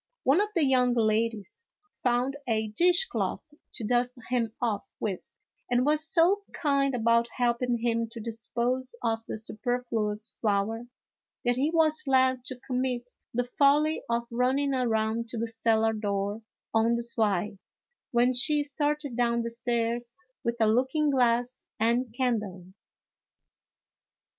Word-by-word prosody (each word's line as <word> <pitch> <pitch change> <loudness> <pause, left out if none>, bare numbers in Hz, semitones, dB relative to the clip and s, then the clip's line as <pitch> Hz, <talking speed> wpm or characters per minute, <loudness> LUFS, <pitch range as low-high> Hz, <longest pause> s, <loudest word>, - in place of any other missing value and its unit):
One 280 +9 +4
of 415 - 0
the 335 - +3
young 250 -2 +3
ladies 225 - -1 0.3
found 250 +2 +1
a 220 -2 0
dish 350 - +3
cloth 310 -9 -3 0.2
to 235 - -6
dust 245 +3 0
him 235 -3 +1
off 225 -5 -2
with, 195 -4 -2 0.5
and 245 +1 +2
was 305 +2 +2
so 375 +3 +4
kind 275 -3 +1
about 235 0 +3
helping 245 0 +1
him 230 -1 0
to 230 0 -9
dispose 235 +3 -3
of 225 -1 +1
the - - -4
superfluous 225 -1 -3
flour 220 +2 0 0.6
that 245 0 +3
he 275 +5 +1
was 320 -2 +2
led 260 -1 +3
to 255 -1 -7
commit 250 -1 -2 0.2
the 245 +1 0
folly 290 +5 +3
of 235 0 0
running 260 +4 +1
around 230 -2 0
to 235 - -5
the 230 +1 -1
cellar 225 0 +1
door 205 0 -2 0.3
on 225 +1 +3
the 235 - -2
sly, 210 -4 -1 0.5
when 245 +1 +3
she 290 +4 +2
started 290 -2 -2
down 235 -1 +1
the 230 - -3
stairs 235 0 -2 0.3
with 235 0 0
a 220 - +4
looking 260 +7 +2
glass 245 -1 +1
and 235 +2 +1
candle. 210 -8 -1
240 Hz, 140 wpm, -28 LUFS, 225-260 Hz, 0.6 s, One